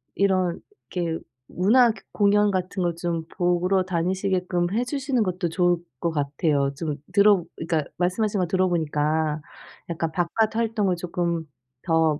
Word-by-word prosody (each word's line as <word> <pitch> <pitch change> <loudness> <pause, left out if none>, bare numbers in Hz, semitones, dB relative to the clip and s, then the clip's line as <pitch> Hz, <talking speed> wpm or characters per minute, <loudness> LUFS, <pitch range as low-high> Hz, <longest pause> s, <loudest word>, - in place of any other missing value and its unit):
이런 185 -3 +1
이런 - - -27 0.3
게 170 -3 -2 0.3
문화 230 +6 +4
그 215 -3 -11
공연 205 0 +3
같은 185 0 -2
거 175 -2 0
좀 170 -1 -2
보러 180 +1 +2
다니시게끔 180 0 0
해 235 +3 +1
주시는 270 -1 -1
것도 180 -4 -1
좋을 175 +1 +2 0.2
것 170 - 0
같아요. 145 -1 0
좀 150 0 -3 0.2
들어 200 -2 +5
그러니까 160 -1 -1
말씀하신 200 +4 0
거 180 - +1
들어 185 +2 +2
보니까 155 -2 0 0.5
약간 165 -1 -2
바깥 185 +7 0
활동을 220 -5 +1
쪼끔 170 -1 -2 0.4
더 160 -3 +2
180 Hz, 295 characters per minute, -24 LUFS, 165-200 Hz, 0.5 s, 들어